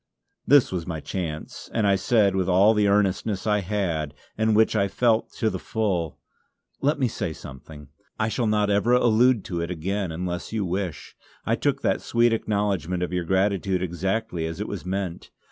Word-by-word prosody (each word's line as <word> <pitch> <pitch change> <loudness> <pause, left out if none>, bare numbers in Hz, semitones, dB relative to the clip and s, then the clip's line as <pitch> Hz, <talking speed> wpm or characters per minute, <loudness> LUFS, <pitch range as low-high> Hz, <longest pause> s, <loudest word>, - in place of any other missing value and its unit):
This 140 -2 +5
was 90 -2 -3
my 80 -3 -3
chance 80 -2 -5
and 110 - +2
I 100 -1 +4
said 100 -1 +2
with 95 -1 0
all 95 +4 +5
the 105 -1 +2
earnestness 100 0 +1
I 105 -1 +2
had, 90 -7 -2 0.2
and 110 0 +2
which 110 +1 +3
I 100 -2 +2
felt 115 +3 +1
to 110 -2 0
the 95 - -4
full: 95 -9 -2 0.6
"Let 145 +3 +2
me 130 -3 +1
say 85 -7 -3
something. 75 -1 -11 0.3
I 110 - +1
shall 115 +1 -1
not 105 -1 +2
ever 105 +4 +2
allude 120 -1 +4
to 85 -2 -3
it 85 - -3
again 95 +2 -2
unless 90 +1 -4
you 110 -3 -1
wish. 90 -3 -4 0.3
I - - +2
took - - -1
that - - +1
sweet 120 0 +2
acknowledgment 100 -5 -1
of 90 - -3
your 90 -1 -1
gratitude 95 0 +1
exactly 95 0 -2
as 80 0 -6
it - - -3
was - - -6
meant. 95 -2 -4
100 Hz, 185 wpm, -25 LUFS, 90-110 Hz, 0.6 s, This